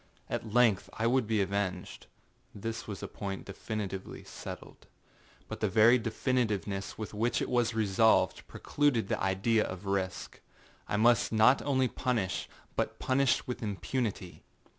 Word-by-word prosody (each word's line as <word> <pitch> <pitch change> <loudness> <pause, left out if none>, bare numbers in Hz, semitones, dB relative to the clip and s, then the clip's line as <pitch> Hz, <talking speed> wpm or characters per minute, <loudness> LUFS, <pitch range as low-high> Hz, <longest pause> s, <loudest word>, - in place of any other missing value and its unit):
At 110 - -3
length 115 -4 +3
I 115 - -2
would 120 -1 +2
be 110 -2 +2
avenged; 95 -1 -3 0.5
this 115 +2 -5
was 100 -3 -6
a - - -3
point 95 -1 -6
definitively 100 -1 -5
settledâbut - - -9 0.8
the - - +1
very 115 +3 +6
definitiveness 110 -4 -1
with 110 -1 -6
which 115 +3 0
it - - -2
was 120 -2 +1
resolved, 105 -4 +2
precluded 140 -8 0
the - - -1
idea 95 +4 +2
of 95 +1 -6
risk. 95 -1 -3 0.5
I 105 - -1
must 115 +1 +4
not 115 +5 +5
only 130 -2 +1
punish, 115 -6 -2 0.3
but - - -1
punish 130 0 +1
with 125 - -5
impunity. 105 -2 -3
110 Hz, 140 wpm, -30 LUFS, 100-120 Hz, 0.8 s, very